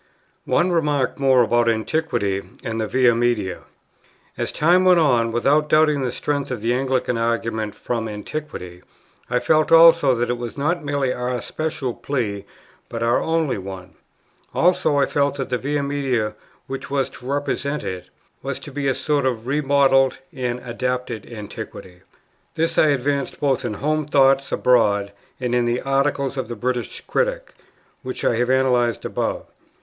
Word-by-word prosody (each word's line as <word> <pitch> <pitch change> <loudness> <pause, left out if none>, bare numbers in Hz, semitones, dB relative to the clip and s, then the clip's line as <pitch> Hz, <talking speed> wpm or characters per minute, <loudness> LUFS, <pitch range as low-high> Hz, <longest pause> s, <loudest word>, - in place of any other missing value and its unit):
One 175 +1 +2
remark 150 -7 0
more 130 -2 +5
about 120 +1 +2
Antiquity 110 -4 -1 0.2
and 115 -2 -3
the 110 - -1
Via 125 +1 +4
Media. 115 -6 0 0.8
As - - -3
time 175 +4 +3
went 180 -2 +5
on, 120 -7 +3
without 145 +6 +2
doubting 155 -2 +4
the 125 -2 -1
strength 145 +2 -2
of 125 -4 -4
the 115 +2 +1
Anglican 130 -2 0
argument 115 -2 -1
from 115 -2 -3
Antiquity, 105 - -7 0.5
I 125 - +1
felt 155 +3 +2
also 165 -4 +7
that 120 +1 0
it 120 - -3
was 120 +1 -6
not 170 +4 0
merely 140 -3 0
our 125 0 -2
special 155 -5 -3
plea, 105 -9 -3 0.4
but 115 0 -4
our 115 +1 +2
only 160 -8 0
one. 95 -1 -8 0.6
Also 170 -4 +3
I 140 - +4
felt 140 0 0
that 135 -1 -5
the 125 - 0
Via 145 +1 -1
Media, 135 -6 -1 0.3
which 135 0 -6
was 135 -2 0
to 125 - -12
represent 145 +1 -2
it, 90 -1 -6 0.3
was - - -4
to - - -9
be 140 0 -2
a 135 - +1
sort 145 -3 0
of 115 -3 -2
remodelled 135 -1 +3 0.2
and 125 -3 -3
adapted 125 -1 -3
Antiquity. 100 -4 -9 0.5
This 165 +1 +1
I - - +5
advanced 140 0 -1
both 135 -4 +1
in 105 - -3
Home 155 +4 -1
Thoughts 135 -1 +3
Abroad 105 -5 +2 0.3
and 125 -2 -2
in 120 -1 +2
the 120 +1 0
Article 140 +1 +1
of 130 -3 -3
the 120 - -5
British 125 +2 -3
Critic - - -2 0.5
which 130 -1 -5
I 115 - +2
have 125 +1 0
analyzed 125 -3 +2
above. - - -2
130 Hz, 165 wpm, -22 LUFS, 120-145 Hz, 0.8 s, also